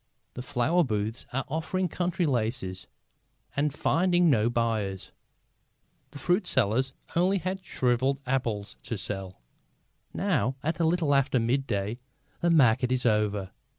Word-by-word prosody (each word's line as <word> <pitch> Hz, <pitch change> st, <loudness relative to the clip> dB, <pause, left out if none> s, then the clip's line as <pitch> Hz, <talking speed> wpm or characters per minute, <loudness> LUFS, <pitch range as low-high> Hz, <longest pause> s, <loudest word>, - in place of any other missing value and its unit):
The 125 Hz, -, -6 dB
flower 145 Hz, +7 st, +2 dB
booths 110 Hz, -2 st, -3 dB
are 135 Hz, +2 st, -2 dB
offering 165 Hz, +5 st, -1 dB
country 175 Hz, +2 st, -1 dB
laces 110 Hz, -, -2 dB, 0.7 s
and 145 Hz, +1 st, +1 dB
finding 175 Hz, +3 st, +3 dB
no 115 Hz, -3 st, +3 dB
buyers. 110 Hz, -5 st, -1 dB, 1.0 s
The 145 Hz, -, -10 dB
fruit 180 Hz, +7 st, +1 dB
sellers 130 Hz, +2 st, +2 dB, 0.2 s
have -, -, -5 dB
only 190 Hz, +3 st, +3 dB, 0.2 s
shrivelled 130 Hz, -4 st, 0 dB
apples 115 Hz, -6 st, -2 dB
to 115 Hz, -, -4 dB
sell. 95 Hz, -1 st, -4 dB, 0.7 s
Now, 130 Hz, +2 st, 0 dB
at 160 Hz, +3 st, -1 dB
a 165 Hz, -, +3 dB
little 165 Hz, -3 st, +2 dB
after 135 Hz, -2 st, +3 dB
midday, 115 Hz, -3 st, -1 dB, 0.4 s
the 170 Hz, -, +1 dB
market 125 Hz, -5 st, +4 dB
is 130 Hz, -1 st, 0 dB
over. 105 Hz, -4 st, +1 dB
130 Hz, 130 wpm, -28 LUFS, 110-160 Hz, 1.0 s, market